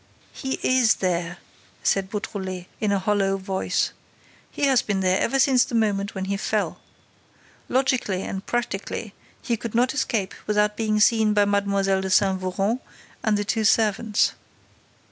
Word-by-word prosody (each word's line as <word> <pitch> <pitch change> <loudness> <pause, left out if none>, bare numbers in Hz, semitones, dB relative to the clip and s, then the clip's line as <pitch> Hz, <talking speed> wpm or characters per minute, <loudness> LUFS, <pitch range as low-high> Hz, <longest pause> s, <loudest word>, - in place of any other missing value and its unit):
"He 265 -1 -3
is 255 -4 +4
there," 175 -2 -2 0.5
said 195 -1 +1
Beautrelet, 190 -4 -5
in 210 -2 0
a 200 - +2
hollow 195 0 +1
voice. 190 0 -1 0.6
"He - - -6
has 265 -3 +4
been 200 -2 -1
there 185 0 +2
ever 270 - +1
since 265 -2 +4
the 235 - -5
moment 205 -3 0
when 190 0 -3
he 200 +1 -1
fell. - - -1 0.9
Logically 250 -8 +1
and 195 0 -5
practically, 220 -2 -3 0.3
he 235 - 0
could 230 0 -6
not 250 +3 +3
escape 215 -9 -1
without 210 0 +2
being 215 -1 0
seen 215 -1 +4
by 205 0 +4
Mlle. 200 -1 +1
de 190 0 +1
Saint 190 0 +3
Véran 195 +6 -1 0.4
and 215 -2 +2
the 205 - -2
two 220 +2 0
servants." 215 0 +2
205 Hz, 155 wpm, -24 LUFS, 195-225 Hz, 0.9 s, is